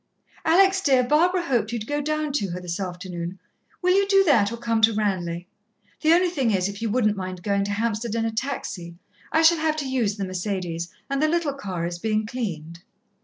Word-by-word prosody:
"Alex, 380 +3 +5
dear, 265 -7 +4
Barbara 345 +7 +3
hoped 235 -8 0
you'd 230 -3 -3
go 290 +4 -1
down 305 0 -1
to 210 -9 0
her 175 +1 -4
this 180 +1 -5
afternoon. 180 -1 -5 0.5
Will 365 +1 +4
you 395 0 +3
do 390 -1 +5
that, 230 - +3
or 235 - -5
come 230 -1 0
to 220 0 +5
Ranelagh? 180 -5 -1 0.6
The 315 +1 +5
only 355 0 +3
thing 270 -9 0
is, 190 -3 +1
if 200 +1 -7
you 225 - -1
wouldn't 215 -2 +2
mind 185 -2 -6
going 200 -1 +1
to 205 - -3
Hampstead 220 +1 -1
in 225 0 0
a 225 - -1
taxi? 220 -8 -4 0.4
I 320 - +3
shall 330 0 +6
have 310 -1 +1
to 295 -3 -3
use 240 -6 0
the 200 - -3
Mercédès, 185 -3 -3 0.2
and 275 0 -1
the 310 - +4
little 325 -3 0
car 190 -11 -4
is 175 0 -4
being 215 +1 0
cleaned." 170 -9 -5
225 Hz, 215 wpm, -24 LUFS, 185-295 Hz, 0.6 s, shall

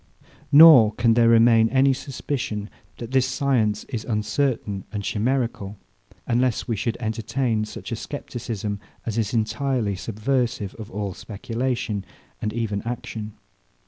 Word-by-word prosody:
Nor 145 -8 +9
can 115 0 +3
there 115 0 +4
remain 115 -1 +5
any 135 +1 +4
suspicion, 130 -6 -4 0.3
that 115 0 -7
this 130 -1 +3
science 130 -6 0
is 115 -5 -5
uncertain 105 -2 -1
and 105 -2 -4
chimerical; 110 -3 -1 0.5
unless 120 0 0
we 115 - 0
should 115 +2 -2
entertain 110 0 -1
such 105 - -9
a - - -1
scepticism 110 -5 -5 0.3
as 115 0 -2
is 105 -3 -1
entirely 115 -1 0
subversive 115 0 -2
of 110 - -8
all 100 -1 -4
speculation, 115 0 -3 0.4
and 105 - -1
even 110 -3 -2
action. 110 -2 -6
115 Hz, 130 wpm, -23 LUFS, 105-125 Hz, 0.5 s, Nor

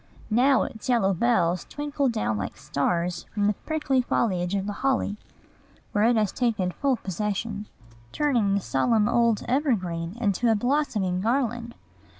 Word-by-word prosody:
Now 260 +4 +4
its 220 +3 -7
yellow 225 -6 +3
bells 180 -4 +1
twinkle 290 -2 -1
down 215 - -1
like 100 -1 -4
stars 170 +5 -1
from 205 -1 0
the 210 - +3
prickly 290 +1 0
foliage 185 -6 0
of 195 -1 -1
the 205 - -3
holly, 265 -6 +1 0.8
where 210 +1 +2
it 240 +1 +4
has 215 -3 +1
taken 220 -7 0
full 275 +6 0
possession, 210 +1 -3 0.4
turning 240 -10 +1
the 200 - 0
solemn 210 - +2
old 235 -2 +2
evergreen 200 - -1
into 230 +1 +1
a 225 - +4
blossoming 215 -7 0
garland. 235 0 -1
215 Hz, 150 wpm, -26 LUFS, 185-245 Hz, 0.8 s, Now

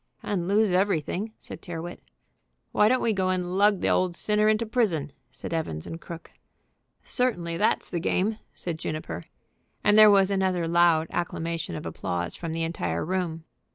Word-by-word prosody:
"And 180 -4 -2
lose 205 +1 +3
everything," 190 +2 0
said - - -10
Tyrrwhit. 175 -1 -7 0.7
"Why 210 +1 +4
don't 255 +1 +2
we 225 - +2
go 190 -2 0
and 180 -1 -1
lug 205 0 +4
the - - +1
old 180 -2 +1
sinner 210 +2 +3
into 215 +1 +2
prison?" 195 - 0 0.2
said 130 +5 -7
Evans 80 - -3
& - - -19
Crooke. 170 -1 -9 0.7
"Certainly 175 -10 -1
that's - - +1
the 175 - -1
game," 210 +6 0 0.2
said 165 -3 -5
Juniper, 85 - -5 0.6
and 210 +1 +5
there 215 0 +10
was 200 -1 +5
another 185 -3 +1
loud 170 -1 +4
acclamation 165 - -3
of - - -6
applause 85 -1 -3
from 165 -2 -5
the 165 0 -2
entire 85 - -2
room. 170 -2 -2
175 Hz, 165 wpm, -26 LUFS, 165-205 Hz, 0.7 s, there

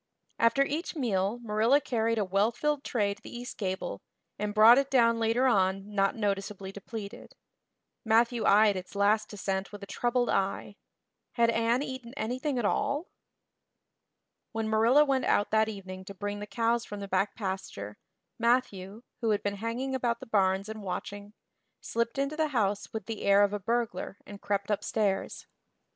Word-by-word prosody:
After 230 +4 +4
each 315 +6 -3
meal 210 -6 0
Marilla 225 +5 +3
carried 230 -4 0
a 210 - +1
well 195 +4 +2
filled 295 +3 -1
tray 205 -4 0
to 200 - -19
the - - -10
east 245 +1 -7
gable 190 -2 -4 0.4
and 210 0 -1
brought 225 +4 +8
it 275 0 -1
down 230 -4 +4
later 230 +3 +2
on 195 -3 +1
not 195 -1 +2
noticeably 195 -2 -3
depleted. 200 +1 -8 0.7
Matthew 230 +1 +2
eyed 210 0 +5
its 185 +1 -7
last 210 +2 +2
descent 195 -1 -3
with 205 -1 -9
a - - -5
troubled 240 +4 0
eye. 195 +1 -1 0.6
Had 235 -1 +3
Anne 230 +3 +1
eaten 260 -2 -7
anything 255 +5 -2
at 240 - 0
all? 285 - 0 1.4
When 225 0 -2
Marilla 230 +7 +5
went 270 -2 +1
out 205 - +2
that 220 0 +3
evening 190 -3 -8
to 200 - -9
bring 205 +1 -4
the 205 - -6
cows 230 +1 0
from 205 -2 -7
the 200 - -6
back 195 +1 0
pasture, 190 - -5 0.4
Matthew, 230 -3 0 0.2
who 230 - 0
had 210 -1 +1
been 205 0 -2
hanging 235 +5 -3
about 240 -2 0
the - - -9
barns 195 -3 +1
and 220 0 -7
watching, 205 +2 -6 0.5
slipped 235 +2 -2
into 275 +2 -1
the 315 0 +1
house 210 -7 -1
with 220 -3 -5
the 225 -2 -5
air 200 0 +5
of 205 0 +1
a 205 - -2
burglar 225 -3 -2
and 205 -1 -11
crept 200 0 -1
upstairs. 205 -1 -1
220 Hz, 170 wpm, -29 LUFS, 200-240 Hz, 1.4 s, brought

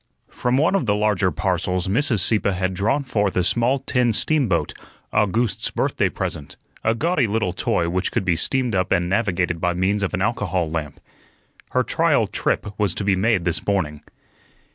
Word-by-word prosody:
From 125 +1 0
one 155 +6 +3
of 175 -11 0
the 105 - +3
larger 105 -3 +1
parcels 90 0 -1
Mrs. 115 - +2
Sieppe 100 +3 +2
had 95 +1 -1
drawn 110 +10 0
forth 105 -8 -1
a 90 - +3
small 120 +8 +2
tin 125 -3 +1
steamboat 105 - +1 0.4
August's 105 +2 +1
birthday - - 0
present 75 - -5 0.3
a 115 - +2
gaudy 155 -1 +1
little 105 -4 -1
toy 85 -2 0
which 90 +2 -1
could - - -1
be 85 -2 +2
steamed 125 +7 0
up 95 -1 0
and 90 -2 +2
navigated 90 -4 0
by 90 -1 0
means 95 +3 0
of 100 - -1
an 95 - -3
alcohol 95 -6 -1
lamp. 80 -3 -4 0.7
Her - - +1
trial - - +2
trip - - -1
was 100 -4 +1
to - - -3
be 100 -1 +2
made 95 -2 +1
this 85 -1 -1
morning. 80 -7 -1
100 Hz, 180 wpm, -22 LUFS, 90-115 Hz, 0.7 s, one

